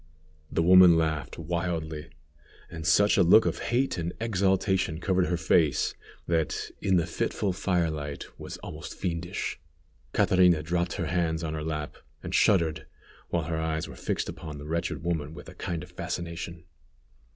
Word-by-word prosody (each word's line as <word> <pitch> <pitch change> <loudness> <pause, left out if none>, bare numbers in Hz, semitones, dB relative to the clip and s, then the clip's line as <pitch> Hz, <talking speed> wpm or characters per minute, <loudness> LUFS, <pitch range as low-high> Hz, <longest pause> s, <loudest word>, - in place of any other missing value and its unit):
The 80 - +1
woman 90 -1 +8
laughed 80 -2 -1
wildly, 80 -2 -3 0.6
and 80 0 -5
such 100 +5 +5
a - - +6
look 110 +6 +7
of - - -1
hate 125 -4 0
and 85 +1 -3
exultation 95 -5 +1
covered 95 -1 +1
her 90 - 0
face, 80 -3 +2 0.3
that, 80 -2 -1
in 95 - +2
the 85 - +2
fitful 90 +3 -1
fire 90 -3 +1
light, 75 -2 -5
was - - -7
almost 80 +2 -7
fiendish. 85 0 -3 0.5
Catrina 90 -4 +4
dropped 85 +2 -1
her 90 - -2
hands 80 0 0
on 80 -1 -2
her 75 -1 -3
lap, 75 -2 -4 0.3
and - - -5
shuddered, 85 -6 +3 0.4
while 85 -2 0
her 80 0 -2
eyes 80 0 -2
were - - -10
fixed - - -2
upon 75 -2 -7
the 70 - -8
wretched 85 +1 -2
woman 80 -3 -2
with 75 - -10
a - - -11
kind 85 -1 -4
of 90 - -13
fascination. 85 -1 -5
85 Hz, 160 wpm, -28 LUFS, 80-90 Hz, 0.6 s, woman